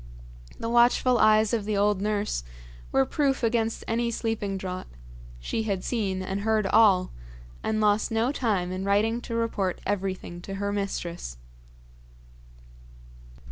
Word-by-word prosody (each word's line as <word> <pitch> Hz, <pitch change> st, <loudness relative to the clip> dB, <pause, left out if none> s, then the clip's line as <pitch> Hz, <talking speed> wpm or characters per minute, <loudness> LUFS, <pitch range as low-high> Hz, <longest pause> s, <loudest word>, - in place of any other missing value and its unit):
The 230 Hz, -, -4 dB
watchful 240 Hz, +1 st, +4 dB
eyes 215 Hz, 0 st, +4 dB
of 225 Hz, -3 st, +1 dB
the 210 Hz, -1 st, -1 dB
old 205 Hz, -1 st, +2 dB
nurse 210 Hz, -, -1 dB, 0.5 s
were 135 Hz, -, +3 dB
proof 275 Hz, -, 0 dB
against 225 Hz, -1 st, 0 dB
any 235 Hz, +1 st, 0 dB
sleeping 220 Hz, -4 st, -2 dB
draught 185 Hz, -1 st, -5 dB, 0.5 s
she -, -, -2 dB
had 200 Hz, -4 st, -2 dB
seen 195 Hz, -6 st, -1 dB
and 195 Hz, +1 st, -3 dB
heard 220 Hz, 0 st, +1 dB
all; 195 Hz, -3 st, +4 dB, 0.5 s
and 220 Hz, 0 st, -1 dB
lost 210 Hz, 0 st, +2 dB
no 225 Hz, +3 st, +1 dB
time 205 Hz, -10 st, 0 dB
in 185 Hz, +1 st, -3 dB
writing 215 Hz, +4 st, +1 dB
to 230 Hz, -, -5 dB
report 215 Hz, -5 st, -1 dB
everything 190 Hz, -3 st, -3 dB
to 195 Hz, +2 st, -6 dB
her 200 Hz, +1 st, -2 dB
mistress. 175 Hz, -, -4 dB
210 Hz, 140 wpm, -26 LUFS, 190-225 Hz, 0.5 s, watchful